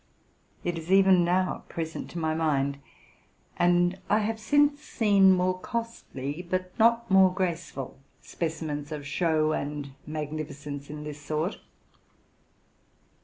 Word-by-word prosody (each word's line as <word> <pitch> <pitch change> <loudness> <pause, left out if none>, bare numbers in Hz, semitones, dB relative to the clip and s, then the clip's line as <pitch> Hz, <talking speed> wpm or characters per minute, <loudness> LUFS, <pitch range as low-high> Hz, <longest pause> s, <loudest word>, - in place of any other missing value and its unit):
It 175 -1 -2
is 165 +3 -7
even 190 -2 +6
now 180 +2 0
present 160 -1 -5
to - - -8
my 160 -1 0
mind; 140 -3 0 0.8
and 175 +1 +3
[ - - -27
have 220 +1 +1
since 290 +5 +3
seen 200 -9 +4
more 185 0 +2
costly, 180 - -5
but 185 +1 -3
not 235 0 +3
more 190 -1 +7
graceful, 170 -8 -3 0.2
specimens 155 -3 -4
of 150 -2 -5
show 155 +1 +1
and 145 -2 -3 0.2
magnificence 150 -2 -5
in 150 0 -6
this 150 -1 -7
sort.. 155 +6 -2
170 Hz, 120 wpm, -27 LUFS, 150-190 Hz, 0.8 s, more